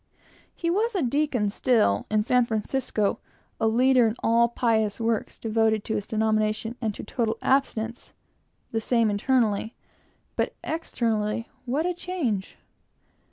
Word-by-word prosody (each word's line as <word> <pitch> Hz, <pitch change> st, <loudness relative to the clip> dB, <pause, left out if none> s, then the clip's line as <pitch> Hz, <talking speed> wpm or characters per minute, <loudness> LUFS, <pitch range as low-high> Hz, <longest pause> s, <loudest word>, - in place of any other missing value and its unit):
He 335 Hz, -1 st, -1 dB
was 435 Hz, +5 st, 0 dB
a 365 Hz, -, +1 dB
deacon 250 Hz, -5 st, +1 dB
still, 215 Hz, -, +2 dB
in 215 Hz, 0 st, +2 dB
San 250 Hz, +2 st, +3 dB
Francisco, 220 Hz, -1 st, -1 dB, 0.4 s
a 225 Hz, -, +2 dB
leader 250 Hz, +3 st, +4 dB
in 220 Hz, -, -2 dB
all 235 Hz, +1 st, +4 dB
pious 220 Hz, -3 st, +1 dB
works, 225 Hz, -1 st, -1 dB
devoted 220 Hz, -1 st, +1 dB
to 220 Hz, -, -3 dB
his 205 Hz, -, -2 dB
denomination 220 Hz, +1 st, 0 dB
and 215 Hz, -3 st, -1 dB
to -, -, -7 dB
total 225 Hz, 0 st, -1 dB
abstinence, 235 Hz, -4 st, 0 dB, 0.6 s
the 225 Hz, -, -1 dB
same 230 Hz, -2 st, +2 dB
internally, 220 Hz, 0 st, +1 dB, 0.6 s
but -, -, -1 dB
externally 230 Hz, -8 st, -1 dB, 0.2 s
what 285 Hz, +7 st, 0 dB
a 360 Hz, -, 0 dB
change! 320 Hz, -, -3 dB
230 Hz, 135 wpm, -26 LUFS, 215-255 Hz, 0.6 s, leader